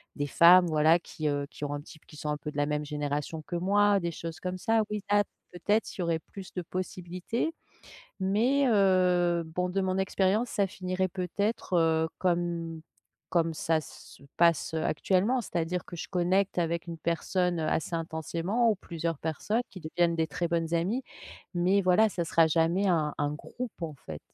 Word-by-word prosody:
des 145 -1 -2
femmes, 175 +4 +7
voilà, 160 +2 +4
qui, 155 -2 -5
heu, 145 -1 -1
qui 145 - -6
ont 145 - -3
un 145 - -4
type 155 0 -15
qui 150 - -14
sont 150 - -4
un 150 - -1
peu 150 - -6
de 145 - -10
la 145 0 +1
même 150 0 -1
génération 150 +1 -3
que 175 - -4
moi, 200 +3 +3
des 170 -1 -2
choses 165 0 -7
comme 185 0 -4
ça. 225 +1 +2
Oui, 210 -2 -3
là, 205 0 +5 0.3
peut-être 205 +5 0
il - - -2
y - - 0
aurait 165 -1 0
plus 190 +3 -11
de 180 - -3
possibilités. 185 - -3 0.7
Mais, 240 +9 +2
heu, 180 -4 +3
bon, 180 +3 -2
de 195 +2 0
mon 185 0 0
expérience, 190 +4 +1
ça 200 - +1
finirait 185 0 -2
peut-être, 195 +3 -2
heu, 160 -1 +3
comme 170 -2 -1 0.5
comme 165 -2 +1
ça 160 0 0
se 140 0 -14
passe, 165 -2 +3
heu, 160 - -1
actuellement. 200 +10 +1
C'est-à-dire 175 -2 -2
que 175 - -9
je - - -5
connecte 185 +2 +1
avec 170 0 -1
une 165 -1 -6
personne, 175 +1 0
heu, 155 - -1
assez 165 +2 -1
intensément 165 +7 0
ou - - 0
plusieurs 165 -4 -4
personnes 205 +9 -1
qui 185 - -11
deviennent 170 +1 +1
des 160 -1 +1
très 170 +1 -2
bonnes 165 0 0
amies. 200 +10 0 0.5
Mais 185 +3 +3
voilà, 185 +4 +4
ça 175 -3 -2
sera 165 0 +4
jamais 170 +5 +2
un 155 -4 +1
un 145 0 0
groupe 225 +6 -7
en 155 -3 -4
fait. 75 -1 -6
175 Hz, 190 wpm, -29 LUFS, 160-190 Hz, 0.7 s, femmes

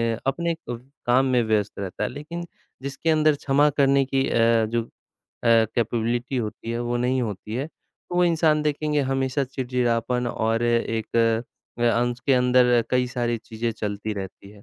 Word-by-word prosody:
अ, - - -11
अपने 170 +4 0
क 120 -1 -4 0.3
काम 130 +2 +4
में 125 -2 +3
व्यस्त 105 -2 +1
रहता 100 +2 -4
है, - - -1
लेकिन 165 +4 -7 0.4
जिसके 140 +4 -3
अंदर 155 -1 +4
क्षमा 145 +1 +3
करने 140 0 +4
की 135 0 0
अ, 115 -1 +3
जो 115 +1 -1
अ, - - -17 0.6
कैपेबिलिटी 115 +2 +1
होती 115 0 -4
है, 115 - -2
वो 120 0 -1
नहीं 125 +2 +1
होती 105 0 -5
है, 135 +4 -2
तो 175 - -14
वो 180 - +4
इंसान 160 -3 +3
देखेंगे 150 0 0
हमेशा 135 +1 0
चिड़-चिड़ापन 125 -1 -1
और 115 +1 0
एक 115 -1 0
अ, 115 0 +3 0.6
उसके 120 +3 0
अंदर 125 -1 +4
कई 125 0 +2
सारी 120 -1 -1
चीज़ें 115 +1 -4
चलती 105 0 -4
रहती 100 0 -8
हैं, 105 -1 -16
120 Hz, 170 wpm, -24 LUFS, 115-135 Hz, 0.6 s, काम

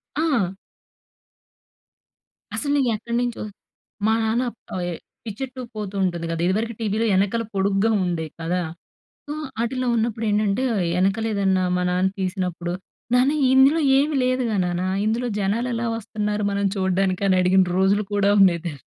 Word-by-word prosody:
ఆ! 270 - +1 2.0
అసలు 290 0 +1 0.2
ఎక్కడినుంచో 235 +2 -2 0.6
మా 220 - +4
నాన్న 225 +3 +1 0.3
ఆహ్, 180 - -2
ఎ - - -3 0.3
పిచ్చెట్టు 255 +4 -6
పోతూ 205 -2 -5
ఉంటుంది 175 -2 -1
కదా! 165 0 -2
ఇదివరకు 220 +5 0
టీవీ‌లో 220 0 0
వెనకాల 200 +4 +1
పొడుగ్గా 195 +3 +2
ఉండేవి 165 -3 -2
కదా! 175 +2 -1 0.7
సో, 295 - -4 0.3
ఆటిలో 255 +2 -1
ఉన్నప్పుడేంటంటే 220 -1 0 0.3
వెనకాలేదన్నా 195 0 +1
మా 180 - 0
నాన్న 185 +1 +2
తీసినప్పుడు, 180 -2 -2 0.4
నాన్న, 255 +3 +4 0.2
ఇందులో 270 +5 +5 0.2
ఏమి 295 +2 +1
లేదుగా 250 -4 0
నాన్న. 175 0 -1 0.2
ఇందులో 230 +3 0
జనాలు 215 +5 0
ఎలా 230 +1 -2
వస్తున్నారు 210 -1 -3
మనం 200 0 -1
చూడడానికి? 190 0 0
అని 185 -1 +4
అడిగిన 185 +1 +4
రోజులు 200 +2 +3
కూడా 200 0 +3
ఉండేది 175 -4 +5
తెల్ 145 -5 -5
205 Hz, 130 wpm, -23 LUFS, 185-235 Hz, 2.0 s, ఇందులో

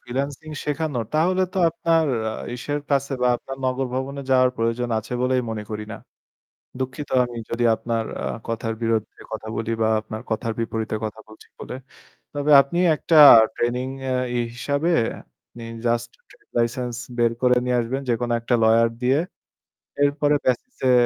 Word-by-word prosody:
freelancing 140 +5 -4
শেখানো। 150 -3 -2
তাহলে 180 +4 +2
তো 190 - -2
আপনার 165 -1 +1 0.2
আ - - -4 0.2
ইসের 145 +4 -3
কাছে 140 0 +1
বা - - +4
আপনার 135 +2 -8
নগর 130 +1 0
ভবনে 135 +2 -3
যাওয়ার 130 -1 +5
প্রয়োজন 115 +2 -1
আছে 110 +3 -8
বলেই 125 0 +2
মনে 110 -1 -4
করি 105 0 -4
না। - - -6 0.8
দুঃখিত 130 +3 -4 0.2
আমি 120 -1 -7
যদি 120 +1 -1
আপনার 115 0 -2 0.2
আ - - -5 0.2
কথার 115 0 -2
বিরুদ্ধে 115 -2 -1
কথা 110 0 -5
বলি 115 0 -3
বা 110 - +3
আপনার 110 +1 -7
কথার 110 +1 -1
বিপরীতে 110 -1 -2
কথা 110 +1 -5
বলছি 110 - -16
বলে। - - -6 0.6
তবে 145 +1 0
আপনি 140 +6 -3 0.2
একটা 165 - 0 0.4
training 125 +2 -1 0.2
আ - - +1 0.2
ই - - +1 0.2
হিসেবে 145 +7 -1 0.5
আপনি 115 - -12 0.2
just 120 0 0 0.2
trade - - -23
license 120 +1 -1 0.2
বের 120 -1 +3
করে 125 0 +4
নিয়ে 125 -1 +1
আসবেন, 130 +4 -3
যেকোনো 120 0 0
একটা 115 +2 -2
lawyer 115 +1 +5
দিয়ে। 130 +3 +3 0.8
এরপরে 145 +1 +2
BASIS 130 - -1
এ - - +6
125 Hz, 160 wpm, -23 LUFS, 115-140 Hz, 0.8 s, এ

